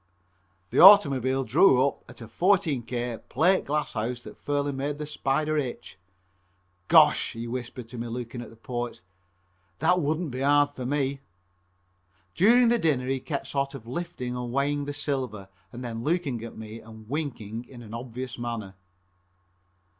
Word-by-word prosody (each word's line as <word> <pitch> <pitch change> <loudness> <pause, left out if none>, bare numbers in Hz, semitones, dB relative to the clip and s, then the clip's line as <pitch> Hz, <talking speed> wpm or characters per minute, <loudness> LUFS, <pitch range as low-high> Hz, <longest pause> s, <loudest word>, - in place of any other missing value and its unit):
The - - +1
automobile 135 - +7
drew 130 - +5
up 140 - -5
at - - -12
a 115 - -8
14k. 125 - 0
plate 185 +3 +3
glass 150 +1 -1
house 120 +2 -2
that - - -11
fairly 145 0 -1
made 140 +2 -3
the 150 - -4
"Spider" 150 +1 -1
itch. 125 -7 -4 0.9
"Gosh," - - +5
he 115 +1 -6
whispered 120 0 -6
to 120 -1 -7
me, 120 - -4
looking 120 +1 -5
at 120 - -9
the - - -15
porch, 120 0 -5 0.8
"that 180 - +3
wouldn't 155 +1 -1
be 130 +2 -5
hard 145 +1 +4
for 130 -3 -6
me." 140 0 -1 1.1
During 235 +5 +5
the 240 0 +3
dinner 145 - +1
he 135 0 0
kept 140 +1 -4
sort 140 0 -2
of 120 -5 -10
lifting 125 -2 -5
and 125 -1 -4
weighing 140 +2 0
the 145 - -4
silver 130 -9 -3 0.2
and 125 +1 -7
then 115 -1 -5
looking 150 -7 -1
at 115 - -9
me 110 +1 -8
and 110 -1 -13
winking 120 -5 -4
in 120 -3 -11
an 110 0 -11
obvious 125 +1 -6
manner. 115 -5 -4
130 Hz, 160 wpm, -27 LUFS, 120-145 Hz, 1.1 s, automobile